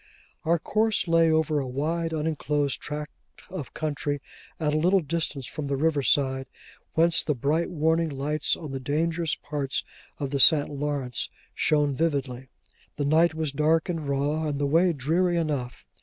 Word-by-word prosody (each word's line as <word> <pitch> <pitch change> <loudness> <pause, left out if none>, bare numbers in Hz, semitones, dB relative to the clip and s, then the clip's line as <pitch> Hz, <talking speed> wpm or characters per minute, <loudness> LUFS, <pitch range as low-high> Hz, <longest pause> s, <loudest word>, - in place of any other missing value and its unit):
Our 170 +2 +3
course 215 +3 0
lay 165 -1 +4
over 155 -1 +2
a 135 - -3
wide, 160 +6 -1
uninclosed 150 -3 -1
tract 150 0 -5 0.4
of 180 -8 -7
country 145 -2 -2 0.4
at 150 -2 0
a - - +2
little 185 +4 +3
distance 155 -4 -3
from 150 +1 -5
the 140 - 0
river 150 0 +1
side, 135 +1 +1 0.5
whence 165 +1 +4
the 150 - -1
bright 150 +7 0
warning 160 0 +1
lights 145 +1 0
on 155 -4 -7
the 135 - -4
dangerous 160 +4 0
parts 145 -2 -3 0.3
of 140 -2 -4
the 140 - -1
St. 145 +1 +6
Lawrence 140 -4 -2 0.2
shone 150 -2 +2
vividly. 135 -4 -2 0.5
The 145 - -2
night 160 +3 +3
was 160 -2 -1
dark 155 +4 +1
and 160 -5 -3
raw, 145 +3 0
and 145 -2 -2
the 145 - 0
way 165 +5 +3
dreary 170 +5 +1
enough. 145 -7 -3
150 Hz, 165 wpm, -26 LUFS, 140-165 Hz, 0.5 s, St